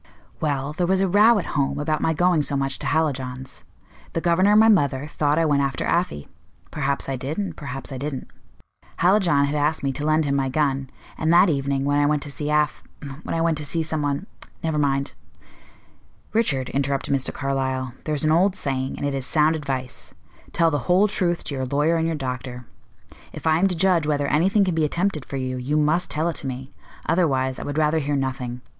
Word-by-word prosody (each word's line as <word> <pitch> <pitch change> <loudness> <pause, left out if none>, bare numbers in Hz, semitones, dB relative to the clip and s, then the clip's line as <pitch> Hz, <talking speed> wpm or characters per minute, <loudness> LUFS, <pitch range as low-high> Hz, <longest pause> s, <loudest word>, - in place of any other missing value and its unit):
"Well, 145 -1 -1
there 175 +2 -1
was 190 +1 +2
a 195 - +2
row 210 +5 +5
at 195 - -2
home 140 -3 0
about 155 +1 -1
my 160 - +2
going 175 0 +2
so 145 -1 -1
much 135 -1 -2
to - - -4
Hallijohn's. 130 -4 -2 0.5
The - - 0
governor 175 +4 +3
and 210 - +7
my 220 - +6
mother 145 -10 +3
thought 150 0 0
I 165 - +3
went 145 -2 +2
after 135 -2 -1
Afy; 170 - -1 0.4
perhaps 140 -2 -2
I 135 - -2
did, 135 +4 -4
and 200 -2 -3
perhaps 135 -1 -7
I 130 - -5
didn't. 140 -1 -4 0.7
Hallijohn 175 -6 +4
had 140 - -2
asked 150 +1 0
me 140 - +1
to 145 - -5
lend 155 +1 +2
him 140 - 0
my 135 -1 0
gun, 135 -2 0 0.3
and 160 +1 +1
that 175 +2 +6
evening, 140 -2 0
when 145 0 +2
I 145 - +3
went 150 -1 +1
to 145 - -6
see 145 +1 -4
Af 150 -1 +1 0.4
when - - -4
I 165 - 0
went 165 -2 +1
to - - -5
see 165 +2 -1
some 155 -1 -2
one 145 +5 -1 0.4
never 160 -2 0
mind 140 -1 0 0.6
" - - -33
"Richard," 140 - +1
interrupted 140 +1 -1
Mr. 135 -1 +1
Carlyle, 130 -2 -2
"there's 155 -1 -1
an 155 - +3
old 185 +4 +3
saying, 135 -6 -3
and - - -3
it 140 - -1
is 135 -2 -3
sound 155 0 +3
advice: 135 -4 -5 0.4
'Tell 165 -1 +2
the 145 - 0
whole 190 +4 +5
truth 175 -4 0
to - - -4
your 130 -1 -3
lawyer 150 +5 +2
and 165 0 0
your 165 - -1
doctor.' 125 -2 -5 0.7
If - - -9
I 160 0 +3
am 195 - +4
to 185 - -1
judge 170 -3 +2
whether 145 -1 +1
anything 190 +8 +3
can 185 - 0
be 160 -1 +1
attempted 165 -1 -1
for 135 - -5
you, 130 -1 -3
you 135 +4 -1
must 155 +4 +1
tell 155 +2 -1
it 170 - -2
to 135 - -5
me; 130 +1 -6 0.3
otherwise, 135 -6 +1
I - - -5
would 145 +1 -4
rather 155 +1 +2
hear 145 -1 -1
nothing. 130 -2 -3
150 Hz, 220 wpm, -23 LUFS, 135-165 Hz, 0.7 s, and